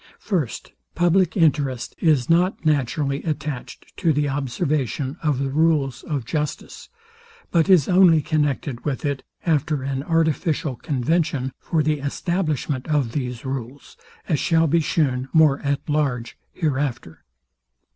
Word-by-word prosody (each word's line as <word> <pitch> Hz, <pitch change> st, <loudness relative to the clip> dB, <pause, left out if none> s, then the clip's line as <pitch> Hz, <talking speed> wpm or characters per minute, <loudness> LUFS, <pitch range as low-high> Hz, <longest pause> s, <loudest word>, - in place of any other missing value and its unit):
First, 170 Hz, -, -3 dB, 0.2 s
public 175 Hz, +1 st, +2 dB
interest 140 Hz, -7 st, +1 dB
is 150 Hz, -7 st, +3 dB
not 175 Hz, +1 st, +2 dB
naturally 140 Hz, -1 st, 0 dB
attached 150 Hz, -5 st, -5 dB
to 170 Hz, -4 st, +2 dB
the 145 Hz, 0 st, +1 dB
observation 135 Hz, -, -2 dB
of 150 Hz, -4 st, +1 dB
the 135 Hz, 0 st, -2 dB
rules 150 Hz, -4 st, +1 dB
of 140 Hz, -6 st, -4 dB
justice; 150 Hz, +3 st, -4 dB, 0.6 s
but 170 Hz, +1 st, +2 dB
is 180 Hz, -7 st, +6 dB
only 180 Hz, -3 st, +6 dB
connected 145 Hz, -4 st, -1 dB
with 145 Hz, -1 st, -3 dB
it, 140 Hz, -2 st, -1 dB, 0.2 s
after 150 Hz, -3 st, +1 dB
an 135 Hz, 0 st, -2 dB
artificial 160 Hz, -2 st, 0 dB
convention 135 Hz, 0 st, -1 dB
for 160 Hz, -2 st, 0 dB
the 150 Hz, 0 st, 0 dB
establishment 150 Hz, -2 st, -2 dB
of 145 Hz, -6 st, +1 dB
these 125 Hz, -2 st, -4 dB
rules, 130 Hz, 0 st, -6 dB, 0.3 s
as 155 Hz, -6 st, +1 dB
shall 165 Hz, +3 st, +3 dB
be 165 Hz, +2 st, +3 dB
shewn 135 Hz, -5 st, 0 dB
more 155 Hz, -4 st, +5 dB
at 140 Hz, -1 st, -2 dB
large 140 Hz, -6 st, -1 dB, 0.2 s
hereafter. 135 Hz, -, -3 dB
145 Hz, 130 wpm, -22 LUFS, 135-160 Hz, 0.6 s, is